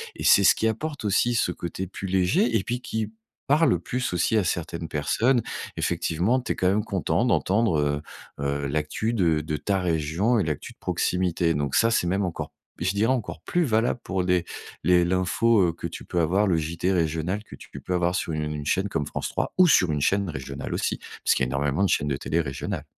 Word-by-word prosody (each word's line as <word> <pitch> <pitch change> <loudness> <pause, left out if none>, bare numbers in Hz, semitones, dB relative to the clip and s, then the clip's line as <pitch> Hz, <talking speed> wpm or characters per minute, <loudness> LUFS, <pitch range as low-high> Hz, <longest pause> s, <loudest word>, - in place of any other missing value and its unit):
et - - -7
c'est 100 - +6
ce - - +7
qui 110 - 0
apporte 145 +5 -4
aussi, 115 +4 +2
ce 90 - +1
côté 90 +2 -5
plus 95 +1 -6
léger 95 +5 +2
et 95 - -2
puis 120 +3 -2
qui 110 -2 -3 0.4
parle 150 - +4
plus 125 +4 -3
aussi, 90 +6 +2
à 105 - +3
certaines 85 0 -3
personnes. 120 - +1 0.4
Effectivement, 95 +11 0
tu - - -2
es - - -12
quand 90 - +2
même 105 +2 +1
content - - 0
d'entendre, 95 -5 +2
heu, 75 0 0 0.4
heu, 70 0 -1
l'actu 75 +10 -1
de 85 -8 +2
de 75 0 -3
ta 95 +5 0
région 85 +7 +1
et 100 - +2
l'actu 75 -2 -4
de - - -45
proximité. 90 -2 0
Donc 70 -2 -1
ça, 115 0 +4
c'est 90 -6 +1
même 100 +3 +1
encore 90 - -4
p - - -57 0.3
je 95 - +2
dirais 110 +5 +2
encore 115 -9 -4
plus 175 - 0
valable 115 0 +1
pour 95 -1 -1
les 90 -1 +1 0.4
les 90 -1 +5
l'info, 95 +5 +2
heu, - - -3
que - - -5
tu - - -9
peux 90 - -2
avoir. 95 +6 +2
Le 90 - +2
Journal 80 +2 -3
télévisé 90 +1 +2
régional 80 +6 -2
que - - -12
tu - - -14
peux 90 - -4
avoir 90 0 +1
sur 85 - -2
une 75 -1 -3
chaîne 95 +6 +1
comme 75 -6 -1
France - - -3
3 - - -2
ou 185 -1 +7
sur 90 - +4
une 75 - -1
chaîne 100 +4 +1
régionale 70 -1 -6
aussi, - - -1 0.3
parce - - +4
qu'il - - 0
y - - -3
a - - -5
énormément 70 +6 0
de 95 - +2
chaînes 75 -2 +1
de 70 - 0
télé 80 - -1
régionales. 70 -4 -4
90 Hz, 225 wpm, -25 LUFS, 80-110 Hz, 0.4 s, ce